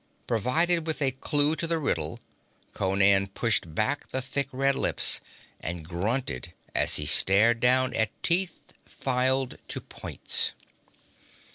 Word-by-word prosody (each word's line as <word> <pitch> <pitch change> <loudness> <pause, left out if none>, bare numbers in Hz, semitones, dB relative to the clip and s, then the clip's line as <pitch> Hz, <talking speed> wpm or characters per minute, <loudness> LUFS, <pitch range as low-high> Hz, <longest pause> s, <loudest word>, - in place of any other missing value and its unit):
Provided 160 - +1
with 160 - -1
a 135 -3 +1
clue 145 +3 0
to 165 - -3
the 165 0 0
riddle, 85 - -2 0.5
Conan 95 +1 +2
pushed 95 -5 -1
back 130 +9 -1
the 130 - -2
thick 135 +1 -2
red 135 +1 +1
lips, - - +4 0.4
and 80 -1 -6
grunted 95 - -3 0.2
as - - +2
he - - +1
stared 110 +5 +4
down 130 +1 +2
at 110 -4 +1
teeth 175 0 -1
filed 130 0 -1
to - - -3
points. - - -2
130 Hz, 130 wpm, -26 LUFS, 100-145 Hz, 0.5 s, lips